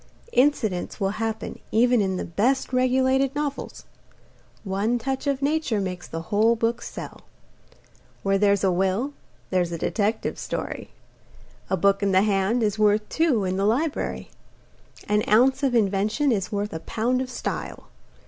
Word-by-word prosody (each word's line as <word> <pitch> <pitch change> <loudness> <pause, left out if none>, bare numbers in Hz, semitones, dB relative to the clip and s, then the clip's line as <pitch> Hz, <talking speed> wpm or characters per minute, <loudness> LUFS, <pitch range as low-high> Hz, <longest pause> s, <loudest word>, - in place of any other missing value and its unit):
Incidents 230 -11 +1
will 195 -1 +1
happen 225 -1 -3
even 240 +1 +4
in 190 -2 0
the - - -3
best 250 +10 0
regulated 260 +2 +2
novels. 290 -1 -4 0.8
One 205 +4 0
touch 265 +3 -3
of 275 -1 0
Nature 290 -6 +1
makes 185 -2 -4
the 165 0 -5
whole 220 +3 +4
book 230 +1 -1
sell. - - -8 1.0
Where 195 0 +2
there's 200 -1 +3
a 190 - +3
will 195 +10 0 0.4
there's 180 -2 +1
a 170 - -3
detective 210 +6 -1
story. - - -5 0.8
A 190 - +1
book 200 +3 +3
in 200 -1 +1
the 190 +1 +5
hand 210 +3 +1
is 210 0 0
worth 210 0 +3
two 305 -10 +2
in 185 0 -1
the 195 - +1
library. 280 +9 -1 0.8
An 210 0 +2
ounce 260 +5 +4
of 265 -3 +1
invention 215 +6 +2
is 200 -3 -1
worth 205 0 -2
a 160 - -4
pound 240 +8 -1
of 260 - -4
style. - - -5
215 Hz, 155 wpm, -24 LUFS, 195-255 Hz, 1.0 s, the